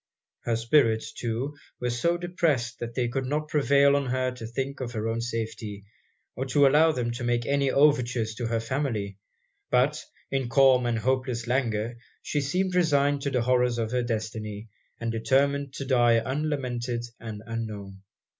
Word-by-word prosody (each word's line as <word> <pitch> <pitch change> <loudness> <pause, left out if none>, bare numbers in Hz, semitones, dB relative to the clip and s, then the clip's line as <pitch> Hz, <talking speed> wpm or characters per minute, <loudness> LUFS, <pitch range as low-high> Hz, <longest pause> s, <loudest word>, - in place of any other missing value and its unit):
Her 115 - +1
spirits, 115 -1 +2
too, 120 +5 -3 0.2
were 125 0 -1
so 170 +9 +1
depressed, 160 -9 -1
that 120 0 -6
they 125 -2 +1
could 130 +2 -2
not 150 +2 -2
prevail 140 -1 +4
on 140 -1 0
her 130 0 0
to 120 -3 -8
think 135 +4 -4
of 120 -2 -4
her 110 -1 -2
own 115 +1 -1
safety, 110 -3 -4 0.5
or 130 - -2
to 140 +2 +4
allow 155 +4 +5
them 120 -5 -2
to 120 +1 -5
make 120 -1 0
any 140 -1 +1
overtures 125 -6 +2
to 115 +1 -3
her 115 0 0
family; 115 -5 -2 0.5
but, 130 +5 +2 0.3
in 135 -3 -1
calm 130 -1 +5
and 120 -1 0
hopeless 130 0 -1
languor, 120 -2 -1 0.3
she 145 - -1
seemed 180 +7 0
resigned 145 -5 +2
to 140 - -1
the 125 -3 0
horrors 125 -1 +2
of 115 -1 -2
her 125 0 +1
destiny, 110 -2 -4 0.3
and 115 -1 -2
determined 140 +4 +1
to 135 - -4
die 120 -3 +4
unlamented 125 -2 -2 0.2
and 110 -2 -7
unknown. 105 -4 -6
125 Hz, 170 wpm, -27 LUFS, 115-140 Hz, 0.5 s, allow